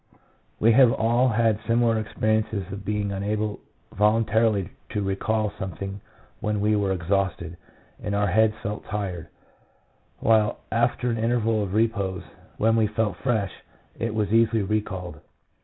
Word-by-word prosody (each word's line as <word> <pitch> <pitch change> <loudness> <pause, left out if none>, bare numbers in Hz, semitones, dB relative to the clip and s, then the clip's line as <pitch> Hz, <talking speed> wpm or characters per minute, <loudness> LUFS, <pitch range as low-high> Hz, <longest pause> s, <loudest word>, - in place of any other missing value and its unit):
We 115 - +5
have 125 0 +6
all 120 0 +2
had 115 -2 +2
similiar 115 -1 +3
experiences 110 -1 -1
of 100 0 -6
being 105 0 -1
un 95 - -4
able 105 0 -2 0.3
voluntarily 105 -1 +2 0.2
to 105 - -2
recall 105 +2 -1
something 95 +1 -5 0.4
when 105 -1 -1
we 105 +1 +2
were 100 -2 +1
exhausted 90 -2 -1 0.5
and 100 -1 -2
our 105 0 +2
heads 110 +3 +3
felt 105 +1 -4
tired, 95 -6 -4 0.9
while 110 -2 +2
after 120 +1 +1
an 115 - -2
interval 115 -1 +1
of 100 -1 -3
repose, 105 -5 0 0.3
when 115 +1 +3
we 110 -1 +3
felt 105 -3 -1
fresh, 110 -8 0 0.5
it 115 -1 -2
was 105 -1 0
easily 115 -1 +3
recalled. 95 -6 -3
105 Hz, 140 wpm, -25 LUFS, 100-115 Hz, 0.9 s, have